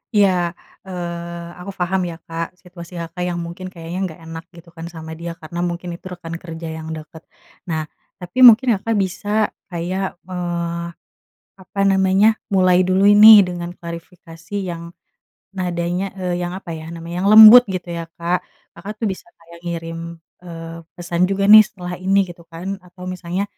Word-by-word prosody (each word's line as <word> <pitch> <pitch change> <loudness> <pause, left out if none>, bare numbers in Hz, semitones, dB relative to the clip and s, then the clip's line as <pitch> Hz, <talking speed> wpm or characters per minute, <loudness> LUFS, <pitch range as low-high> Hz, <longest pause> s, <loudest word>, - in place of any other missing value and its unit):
Iya, 180 -4 +2 0.3
eee, 170 -1 -6
aku 190 +3 -7
paham 185 +2 0
ya 170 - -6
Kak, 165 +2 -5
situasi 175 -1 -12
Kakak 170 +2 -5
yang 175 -1 -3
mungkin 180 +2 -8
kayaknya 165 +1 -7
nggak 160 -1 -12
enak 165 0 -8
gitu 170 0 -15
kan 165 0 -8
sama 160 -2 -9
dia, 170 0 -6
karena 170 +1 -8
mungkin 175 +1 -6
itu 170 - -17
rekan 165 -2 -7
kerja 165 -1 -7
yang 160 0 -8
dekat. 160 +1 -11 0.4
Nah, 160 -2 -2 0.4
tapi 180 +6 -6
mungkin 240 +3 +7
Kakak 225 +3 -1
bisa 205 +3 -1 0.2
kayak, 185 +2 -3
eee, 170 -1 -4 0.7
apa 195 +1 -7
namanya, 195 +2 +4 0.2
mulai 185 -2 +4
dulu 185 +2 +2
ini 205 -1 +9
dengan 175 -1 -5
klarifikasi 170 +1 -10
yang 170 -3 -5 0.6
nadanya, 180 0 -2
eee, 180 -2 -2
yang 175 +1 -4
apa 190 -3 -8
ya 160 0 -8
namanya, 170 +1 -6
yang - - +3
lembut 220 +3 +11
gitu 180 -2 -4
ya 170 -1 -5
Kak, 170 +2 -1 0.3
Kakak 195 +5 -8
tuh 225 - -2
bisa 185 - -11
kayak 170 0 -16
ngirim, 170 -1 -6 0.2
eee, 165 -1 -9 0.2
pesan 175 +1 0
juga 195 0 0
nih 215 - +12
setelah 180 -3 -7
ini 190 +2 +2
gitu 170 -1 -20
kan. 185 +4 -6
Atau 180 0 -13
misalnya 185 +1 -3
175 Hz, 165 wpm, -20 LUFS, 170-190 Hz, 0.7 s, nih